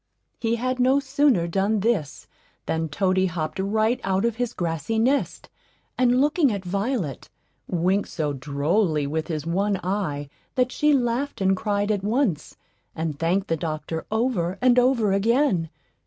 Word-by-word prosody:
He 230 0 0
had 255 +2 -2
no 260 +3 +4
sooner 275 - +2
done 195 +4 0
this 200 - -1 0.4
than 160 0 -1
Toady 185 +4 +1
hopped 160 -1 -4
right 215 +5 +1
out 195 +2 +1
of 235 -1 -1
his 245 -2 -1
grassy 165 +4 -2
nest, 260 +6 0 0.5
and 250 0 +3
looking 295 0 +3
at 200 -3 -4
Violet, 200 - -2 0.4
winked 185 +4 0
so 150 -3 -2
drolly 150 +4 0
with 155 +2 -2
his 155 -3 -3
one 195 +3 0
eye 175 -7 -2 0.3
that 255 -1 +1
she 300 +3 +2
laughed 260 +1 0
and 190 0 +3
cried 205 +1 -1
at 205 -2 0
once, 210 - -1 0.4
and 160 -2 -3
thanked 185 +4 +1
the 165 - +1
doctor 160 0 -4
over 215 -6 0
and 250 -1 +5
over 245 -5 +3
again. 210 - +2
200 Hz, 155 wpm, -24 LUFS, 165-240 Hz, 0.5 s, and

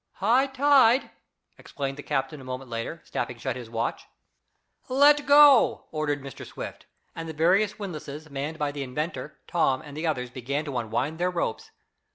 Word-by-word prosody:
"High 240 +8 +3
tide!" 265 -2 +4 0.5
exclaimed 135 -1 -5
the 145 - -8
captain 140 0 -2
a - - -11
moment 130 0 -7
later, 115 +8 -5
snapping 120 - -4
shut 130 +1 -3
his 120 -3 -8
watch. 115 0 -3 0.8
"Let 290 +2 +5
go!" 285 -3 +6
ordered 145 -3 -2
Mr. 140 -3 -9
Swift, - - -8 0.3
and 165 0 -6
the - - -5
various 185 +7 +2
windlasses 155 -6 -7
manned 145 +2 -5
by 150 -2 -1
the 145 0 -6
inventor, 150 +1 -4
Tom 135 -7 +1
and 145 -2 -11
the 160 +2 -2
others 125 -5 -2
began 140 +4 -3
to 140 -3 -5
unwind 120 +8 -2
their 180 +1 +2
ropes. 170 -10 -3
150 Hz, 170 wpm, -26 LUFS, 135-180 Hz, 0.8 s, go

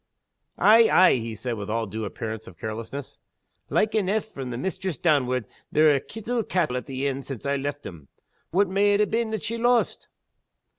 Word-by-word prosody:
"Ay! 225 +2 +6
ay!" 185 - +6
he 115 -1 -5
said, 120 +3 -3
with 100 0 -6
all 115 +1 0
due 110 +1 -5
appearance 110 +1 -6
of 90 - -12
carelessness. 115 +7 -6 0.5
"Like 215 +1 +1
eneugh. 215 0 +1
From 135 -12 -7
the 120 - -4
mistress 185 +2 -3
downward, 130 -7 +1 0.3
they're 155 -1 +5
a' - - +1
kittle 225 - -3
cattle 175 - 0
at 125 - -4
the 135 0 -3
inn 135 0 -2
since 135 -3 -8
I've 140 0 0
left 145 +1 -4
'em. 80 -6 -9 0.4
What 195 +3 +2
may 200 +2 +3
it 210 +1 +3
ha' - - -13
been 230 0 0
that 220 -3 -3
she 230 +1 -3
lost?" 240 0 +1
140 Hz, 195 wpm, -25 LUFS, -, 0.5 s, Ay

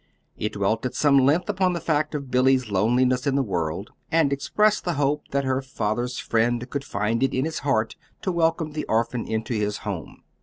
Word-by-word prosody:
It 105 - -3
dwelt 105 +2 0
at - - -9
some 140 -2 +4
length 145 +7 +3
upon 190 -3 +1
the 170 - -2
fact 155 -1 0
of 140 -3 -5
Billy's 130 -2 +3
loneliness 125 +7 +2
in 135 - +2
the 140 - +2
world, 90 -1 -3 0.2
and 160 -4 +3
expressed 210 +9 +1
the 175 - -1
hope 145 +1 0
that 140 0 0
her 130 0 0
father's 125 -1 -2
friend 120 +2 0
could 140 -1 -2
find 105 0 -1
it 135 - +1
in 130 +2 +1
his 160 0 -3
heart 115 -6 0 0.3
to 190 - 0
welcome 165 -2 +1
the 150 0 -4
orphan 115 +1 0
into 110 +2 -2
his 105 -2 -1
home. - - -6
130 Hz, 200 wpm, -24 LUFS, 115-150 Hz, 0.3 s, some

